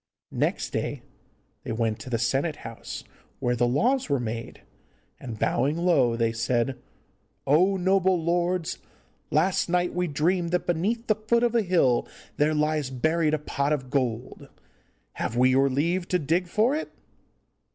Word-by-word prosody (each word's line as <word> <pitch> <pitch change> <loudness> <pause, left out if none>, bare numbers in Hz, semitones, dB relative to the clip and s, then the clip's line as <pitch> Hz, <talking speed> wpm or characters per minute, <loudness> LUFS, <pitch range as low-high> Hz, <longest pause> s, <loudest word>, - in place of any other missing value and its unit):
Next - - -1
day - - -3 0.6
they - - -6
went 115 -1 -1
to - - -8
the 120 - 0
senate 135 +7 0
house, 115 0 -7 0.3
where 125 0 0
the 120 0 +2
laws 240 - +1
were 140 -2 +2
made, 115 -1 -5 0.6
and, 120 -4 -7
bowing 145 +8 +1
low, 155 -9 +3
they 115 -1 +1
said, 120 +2 -1 0.7
'Oh, 180 +8 +4
noble 190 0 +2
lords, 175 +1 0 0.5
last 175 +4 +1
night 180 0 +1
we 180 0 0
dreamed 170 +4 0
that 180 - +1
beneath 205 +8 -1
the 215 - +3
foot 220 +3 0
of 240 -1 +2
a 235 - +3
hill 170 - +2 0.3
there 150 +1 +2
lies 150 -2 0
buried 155 +4 +1
a - - -1
pot 145 -1 -2
of 130 -4 -4
gold. 125 -5 -2 0.6
Have 115 - -3
we 130 +1 +5
your 135 +1 +4
leave 170 +7 0
to 180 - +2
dig 170 +3 0
for 220 +9 +2
it? 315 - -4
155 Hz, 160 wpm, -26 LUFS, 130-180 Hz, 0.7 s, we